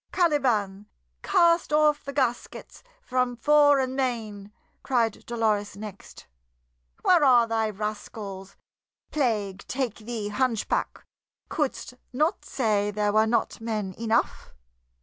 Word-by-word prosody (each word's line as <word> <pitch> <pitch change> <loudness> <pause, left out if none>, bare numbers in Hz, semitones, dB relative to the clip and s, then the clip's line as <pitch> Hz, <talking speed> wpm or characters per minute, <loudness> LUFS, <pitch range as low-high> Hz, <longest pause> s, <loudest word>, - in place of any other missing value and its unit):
"Caliban, 240 - +1 0.3
cast 335 -2 +3
off 300 -1 +3
the 280 - -6
gaskets 260 -4 -3 0.2
from 255 - 0
fore 290 +3 +5
and 260 -1 -1
main!" 220 -6 -3 0.3
cried 235 -5 0
Dolores 215 -4 -1
next. 205 -2 -10 0.8
"Where 350 -4 +5
are 245 -4 +6
thy 225 -1 0
rascals? 205 -2 -6 0.6
Plague 210 -9 -1
take 255 -4 -2
thee, 220 -2 -5
hunchback! 235 0 -1 0.4
Couldst 290 -4 -2 0.2
not 305 +9 0
say 210 -5 0
there 210 0 -1
were 215 +1 +4
not 235 0 -1
men 215 -4 -3
enough? 230 0 -1
230 Hz, 110 wpm, -26 LUFS, 210-265 Hz, 0.8 s, are